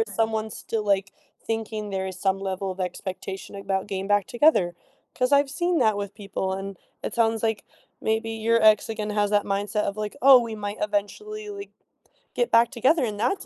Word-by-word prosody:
is 450 - -2
someone 220 -1 0
still, 220 0 -4
like, 195 -1 +1 0.3
thinking 220 -2 -3
there 190 -1 -2
is 185 -1 -6
some 195 0 +1
level 190 0 -3
of 185 +1 -7
expectation 190 +2 -5
about 195 0 -2
getting 195 -1 -3
back 205 -1 +2
together? 240 - +3 0.4
'Cause 250 +1 0
I've 280 -1 +4
seen 345 +4 0
that 215 -3 +3
with 200 -1 -5
people, 190 -2 -3
and 195 -1 -6 0.2
it - - -4
sounds 225 -1 +1
like 220 -3 -1 0.3
maybe 220 +1 0
your 225 +1 +1
ex 215 -1 +5
again 215 -1 -3
has 210 -1 +1
that 205 0 +2
mindset 205 +1 -1
of 200 +1 -3
like, 210 -1 -4
"Oh, 270 -1 +9
we 230 -2 -3
might 205 -1 -5
eventually, 420 - -3
like, 400 0 -8 0.6
get 485 - 0
back 230 0 +5
together," 260 +3 +3
and 210 -2 -4
that's 245 - 0
210 Hz, 195 wpm, -25 LUFS, 195-230 Hz, 0.6 s, Oh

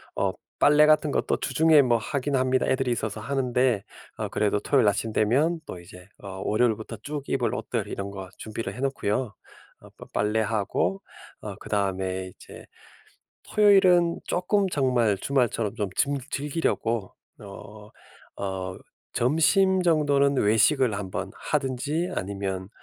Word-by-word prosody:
어 - - +1 0.3
빨래 150 +1 +6
같은 155 -1 +3
것도 - - 0
주중에 150 +2 +4
뭐 120 -2 +3
하긴 140 +4 -2
합니다. 130 0 +2
애들이 130 -1 0
있어서 110 -2 -3
하는데. 125 -3 0 0.3
어 - - -3
그래도 105 0 0
토요일 130 -3 +2
아침 110 +2 0
되면 145 +10 +2
또 90 - -7
이제 90 +1 -14 0.2
어 95 -1 -7
월요일부터 110 0 0
쭉 145 0 -4
입을 - - 0
옷들 - - -3
이런 100 0 -5
것 95 -2 -8
준비를 110 +1 -5
해 125 - -10
놓고요. 130 -4 -1 0.5
어 - - -15
빠 - - -9
빨래하고 105 -3 0 0.4
어 - - -6
그다음에 95 -2 -2
이제 - - -13 0.9
토요일은 185 -5 +5
쪼끔 195 +2 +1
정말 125 - +1
주말처럼 120 -5 0
좀 105 -4 -2
즘 140 0 +1
즐기려고 135 - -1 0.3
어 105 +1 -11 0.5
어 95 -1 -4 0.4
점심 185 - +3
정도는 145 -4 +3
외식을 120 +3 +3
한번 95 -2 -5
하든지 145 +5 -2
아니면 95 -1 -4
120 Hz, 285 characters per minute, -26 LUFS, 100-145 Hz, 0.9 s, 빨래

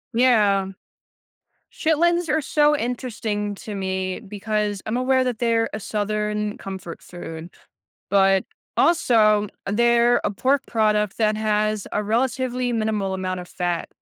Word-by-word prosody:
Yeah. 210 -6 +4 1.1
Chitlins 340 +2 +1
are 310 +2 +2
so 295 0 +3
interesting 225 -5 -3
to 210 +1 -7
me 190 -1 -2
because 210 -1 -3
I'm 220 - -1
aware 260 +1 +2
that 245 -3 -2
they're 230 -1 +1
a - - -3
Southern 210 0 -2
comfort 190 -3 -8
food 165 -1 -8 0.6
but 195 -1 +4 0.3
also, 215 - +3 0.2
they're 235 +3 +3
a - - 0
pork 265 +6 +1
product 210 -2 +1
that 215 -1 +2
has 215 -1 0
a 210 - 0
relatively 250 +2 0
minimal 215 -3 -1
amount 185 -1 -3
of 180 - -11
fat. 175 -1 -2
215 Hz, 130 wpm, -23 LUFS, 200-245 Hz, 1.1 s, Yeah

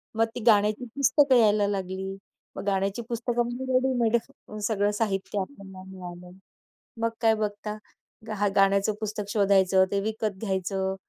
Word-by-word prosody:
मग 225 - +3
ती - - -3
गाण्याची 210 +2 +4
पुस्तकं 280 0 +4
यायला 210 -3 +4
लागली. 190 -1 -3 0.4
मग - - -5
गाण्याची 195 +3 0
पुस्तकं 240 +1 -1
म्हणजे 245 +2 -5
रेडीमेड 250 -3 +2 0.5
सगळं 205 -2 +1
साहित्य 200 -2 -1
आपल्याला 190 -4 -8
मिळालं. 180 0 -10 0.6
मग 230 - +2
काय 225 -1 +5
बघता. 210 0 -3 0.6
हां, 205 0 +1
गाण्याचं 195 +1 +3
पुस्तक 210 -1 -4
शोधायचं. 195 -2 +4
ते 200 - +1
विकत 215 -2 -2
घ्यायचं 190 -1 -1
205 Hz, 135 wpm, -26 LUFS, 195-225 Hz, 0.6 s, काय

